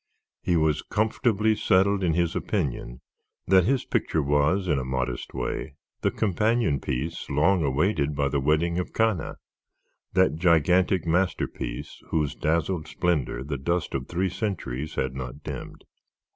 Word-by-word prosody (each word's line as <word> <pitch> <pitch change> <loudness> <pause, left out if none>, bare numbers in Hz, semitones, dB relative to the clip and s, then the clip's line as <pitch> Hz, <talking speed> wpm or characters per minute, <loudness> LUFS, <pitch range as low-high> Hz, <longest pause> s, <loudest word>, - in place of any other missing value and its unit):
He 85 - +1
was 80 -2 +2
comfortably 110 0 +1
settled 100 -1 +2
in 85 -3 +2
his 85 -1 +1
opinion 65 - -2 0.4
that 95 -1 +5
his 130 +1 +1
picture 80 - 0
was, 75 +7 +2
in 75 -5 +2
a - - -3
modest 65 -1 -3
way, 70 - -3 0.3
the - - +2
companion 110 - +1
piece 65 +7 -4
long 80 +5 +3
awaited 75 +1 +1
by 70 -1 +1
the 70 - 0
"Wedding 80 +5 +1
of 90 - -4
Cana," 110 -6 0 0.8
that 95 -4 +3
gigantic 90 +2 +3
masterpiece 90 +1 -2
whose 75 -3 0
dazzling 80 +1 0
splendor 80 -7 -1
the 70 -1 -4
dust 85 +5 -1
of 65 -1 -3
three 95 +2 0
centuries 80 - -3
has 65 - -1
not 65 +2 -7
dimmed. - - -7
85 Hz, 145 wpm, -26 LUFS, 70-95 Hz, 0.8 s, that